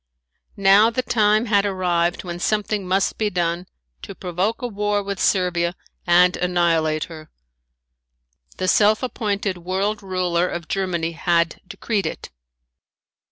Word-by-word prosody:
Now 200 +3 +6
the 255 +2 -2
time 215 -2 +2
had 205 -3 +3
arrived 180 -3 0
when 175 -1 -6
something 210 0 -1
must 190 +1 0
be 215 -1 +1
done 175 -1 -2 0.3
to - - -9
provoke 185 +7 -2
a - - 0
war 205 -2 -1
with 200 -1 -5
Servia 175 -2 +1 0.3
and 180 +1 +5
annihilate 165 -3 +1
her. 155 -2 -10 1.3
The 185 - -2
self 215 +4 +3
appointed 205 -6 -2
world 190 +4 -2
ruler 180 -2 0
of 170 -2 -5
Germany 175 -4 -1
had 170 0 0
decreed 200 -1 -2
it. - - -7
185 Hz, 130 wpm, -22 LUFS, 175-205 Hz, 1.3 s, Now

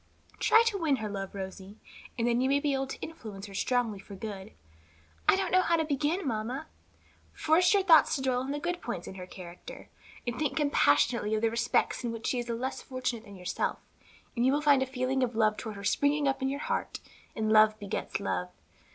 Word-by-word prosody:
"Try 450 - +6
to 430 -4 0
win 310 -5 +2
her 220 -4 -4
love, 195 -1 -5
Rosie, 190 +1 -7 0.4
and 235 0 +1
then 240 +1 +2
you 260 - +2
may 280 +1 +3
be 285 -1 0
able 270 0 -1
to - - -7
influence 215 -11 -8
her 200 - -11
strongly 230 0 0
for 200 +1 -11
good." 200 0 -7 0.8
"I - - +7
don't 380 -2 -1
know 370 - +5
how 340 -2 +2
to 320 -1 +1
begin, 300 +4 -1
mamma." 240 +5 -3 0.7
"Force 325 +3 +3
your 395 - +3
thoughts 330 -4 +6
to 275 - -3
dwell 255 -1 +1
on 260 +2 -4
the 290 - -1
good 350 +3 -3
points 190 -8 -5
in - - -7
her 185 -1 -8
character, 180 -1 -10 0.4
and 240 0 -3
think 300 -2 -1
compassionately 235 - +3
of 215 - -2
the 225 - +3
respects 235 +2 +1
in 240 - -1
which 230 -1 -7
she 250 - 0
is 240 0 -5
less 245 +3 -3
fortunate 255 -3 -4
than 200 -2 -11
yourself, 180 -1 -2 0.6
and 235 - +1
you 260 - +4
will 295 - +1
soon - - -9
find - - -3
a 265 - 0
feeling 260 +1 -1
of 245 -2 0
love 215 -1 +3
toward 220 -1 -6
her 200 - -9
springing 285 +7 +2
up 270 0 0
in 265 - +1
your 280 +2 -3
heart; - - -2 0.4
and 215 -1 0
love 215 0 +6
begets 200 -2 -4
love. 90 -2 -2
245 Hz, 225 wpm, -29 LUFS, 215-285 Hz, 0.8 s, I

